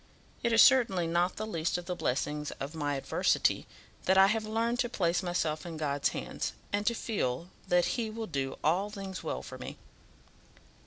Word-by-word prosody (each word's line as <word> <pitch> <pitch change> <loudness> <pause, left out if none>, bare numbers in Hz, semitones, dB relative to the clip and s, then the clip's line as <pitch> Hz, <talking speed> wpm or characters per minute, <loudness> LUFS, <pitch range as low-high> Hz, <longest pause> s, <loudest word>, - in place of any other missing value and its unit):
It 235 - +1
is 230 - +8
certainly 230 -10 +5
not 170 +2 +1
the 215 - -3
least 170 -5 -1
of 175 - -6
the 180 - -2
blessings 150 0 -1
of 140 +3 -4
my 145 -3 -1
adversity 135 - +1 0.4
that 190 - +4
I 190 - +9
have 215 +2 +1
learned 230 +2 0
to 240 - +1
place 175 -6 +1
myself 170 -4 -1
in 170 -2 -6
God's 145 -2 +1
hands, - - -4 0.2
and 205 0 0
to 235 - +3
feel 170 - -2 0.2
that 175 0 +4
he 230 -3 -1
will 220 +1 -4
do 135 -7 -3
all 185 +7 +2
things 195 -2 -6
well - - -3
for - - -9
me." - - -7
180 Hz, 190 wpm, -31 LUFS, 155-215 Hz, 0.4 s, I